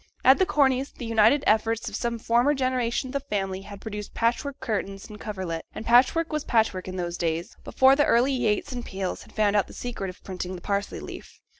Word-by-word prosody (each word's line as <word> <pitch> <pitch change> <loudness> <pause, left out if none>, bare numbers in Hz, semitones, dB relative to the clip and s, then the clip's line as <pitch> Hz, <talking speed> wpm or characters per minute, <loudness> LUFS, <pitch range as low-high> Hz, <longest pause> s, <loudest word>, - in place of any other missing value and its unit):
At 265 - +7
the 375 - +3
Corneys', 275 -6 +2
the 245 - -7
united 230 +6 +4
efforts 225 +2 +2
of 210 - -4
some 235 +1 -2
former 240 +6 +2
generation 255 -1 0
of - - -8
the 280 - 0
family 195 -8 -3
had 200 0 -10
produced 210 -1 -7
patchwork 245 +4 0
curtains 200 -5 -3
and 210 -2 -11
coverlet; 185 -6 -4
and 220 - -6
patchwork 270 +7 +4
was 305 -1 -1
patchwork 220 -6 +1
in 185 - -5
those 175 -1 -3
days, 170 +4 -2
before 265 +1 +5
the 290 +1 +3
early 250 +4 +3
Yates 240 +1 0
and 245 -2 -4
Peels 190 -3 -4
had - - -15
found 210 -1 +1
out 205 - +3
the - - -12
secret 230 -6 -5
of 185 - -12
printing 185 -1 -5
the 175 - -9
parsley 200 0 -2
leaf. - - -10
225 Hz, 215 wpm, -26 LUFS, 195-260 Hz, -, At